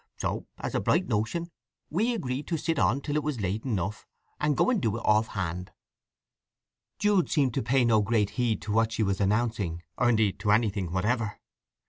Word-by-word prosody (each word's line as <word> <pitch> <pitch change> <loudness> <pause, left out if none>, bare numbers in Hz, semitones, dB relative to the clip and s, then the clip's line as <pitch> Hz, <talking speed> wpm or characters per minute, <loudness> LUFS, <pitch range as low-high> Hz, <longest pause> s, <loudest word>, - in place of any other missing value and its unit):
So, - - -3
as - - -4
a - - +1
bright - - +2
notion, 145 +12 -1 0.4
we 225 +9 +1
agreed 135 - -3
to 165 - -1
sit 160 +1 -1
on 115 +10 +2
till 145 +1 -3
it 150 - +2
was 150 -5 -3
late 100 +2 -2
enough, 105 -4 -2 0.3
and 150 -2 +1
go - - +3
and 225 -7 +1
do 110 -3 0
it - - -6
off 110 +1 +4
hand." 90 -3 -4 1.3
Jude 205 -3 +2
seemed 140 -6 +2
to - - 0
pay 125 +2 +2
no 110 -2 +4
great 105 -1 +1
heed 120 -3 -1
to 105 - -4
what 115 +1 +2
she 110 - 0
was 100 0 0
announcing, 100 -5 0 0.2
or 125 - +4
indeed 110 -4 +2
to 105 - +1
anything 105 -5 +1
whatever. 105 +4 -1
115 Hz, 195 wpm, -28 LUFS, 105-140 Hz, 1.3 s, off